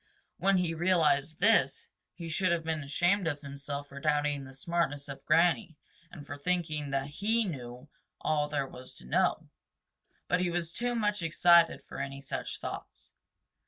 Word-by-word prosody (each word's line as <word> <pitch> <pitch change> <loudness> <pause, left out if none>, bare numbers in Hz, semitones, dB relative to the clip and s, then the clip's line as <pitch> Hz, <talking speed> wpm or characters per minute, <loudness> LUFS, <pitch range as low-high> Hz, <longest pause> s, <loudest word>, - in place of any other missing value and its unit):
When 195 +2 +4
he 175 -2 0
realized 160 -3 +2
this, 225 +4 +3 0.3
he 170 - -7
should 180 +3 +1
have 170 -1 +1
been 160 -1 -2
ashamed 175 +6 +1
of 145 -2 -2
himself 140 0 -6
for 140 - -9
doubting 145 -1 0
the 135 - -12
smartness 145 -2 -1
of 140 -1 -8
Granny 170 0 +3 0.3
and 145 - -10
for 145 - -7
thinking 155 -3 -1
that 135 0 -1
he 215 +10 0
knew 125 -6 -7 0.3
all 150 -1 +1
there 145 -2 0
was 130 -1 -11
to - - -13
know. 60 - +1 0.8
But 180 - +2
he 180 -1 +1
was 170 -1 -2
too 245 +3 -1
much 210 -3 0
excited 170 +1 +4
for - - -9
any 135 0 -4
such 140 - -5
thoughts. - - -8
160 Hz, 165 wpm, -30 LUFS, 140-175 Hz, 0.8 s, When